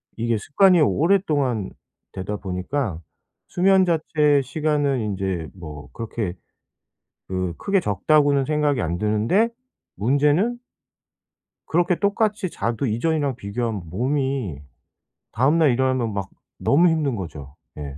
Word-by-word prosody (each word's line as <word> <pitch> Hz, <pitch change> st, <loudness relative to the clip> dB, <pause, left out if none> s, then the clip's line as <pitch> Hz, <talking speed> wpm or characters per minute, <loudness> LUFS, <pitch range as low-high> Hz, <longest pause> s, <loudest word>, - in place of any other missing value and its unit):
이게 115 Hz, 0 st, 0 dB
습관이 180 Hz, -, +4 dB
오랫동안 145 Hz, -, +1 dB, 0.4 s
되다 95 Hz, +2 st, -4 dB
보니까 95 Hz, -, -3 dB, 0.5 s
수면 190 Hz, +1 st, +4 dB
자체의 155 Hz, -4 st, +2 dB
시간은 145 Hz, -1 st, 0 dB
인제 95 Hz, -6 st, -2 dB
뭐 75 Hz, -5 st, -10 dB
그렇게 110 Hz, -5 st, -4 dB, 0.9 s
그 95 Hz, -2 st, -2 dB
크게 195 Hz, -1 st, +1 dB
적다고는 140 Hz, -, +2 dB
생각이 150 Hz, -3 st, +1 dB
안 85 Hz, -3 st, -1 dB
드는데 110 Hz, -, +1 dB, 0.4 s
문제는 145 Hz, -, +2 dB, 1.1 s
그렇게 175 Hz, +1 st, +1 dB
똑같이 205 Hz, -2 st, 0 dB
자도 115 Hz, +2 st, -2 dB
이전이랑 140 Hz, +3 st, 0 dB
비교하면 105 Hz, -1 st, -3 dB
몸이 130 Hz, -, -1 dB, 0.7 s
다음 135 Hz, +8 st, +2 dB
날 155 Hz, -4 st, +4 dB
일어나면 130 Hz, -3 st, 0 dB
막 100 Hz, -1 st, -4 dB, 0.3 s
너무 170 Hz, +6 st, +4 dB
힘든 155 Hz, -6 st, 0 dB
거죠. 75 Hz, -8 st, -8 dB, 0.2 s
예. 70 Hz, -2 st, -7 dB
130 Hz, 260 characters per minute, -23 LUFS, 100-155 Hz, 1.1 s, 습관이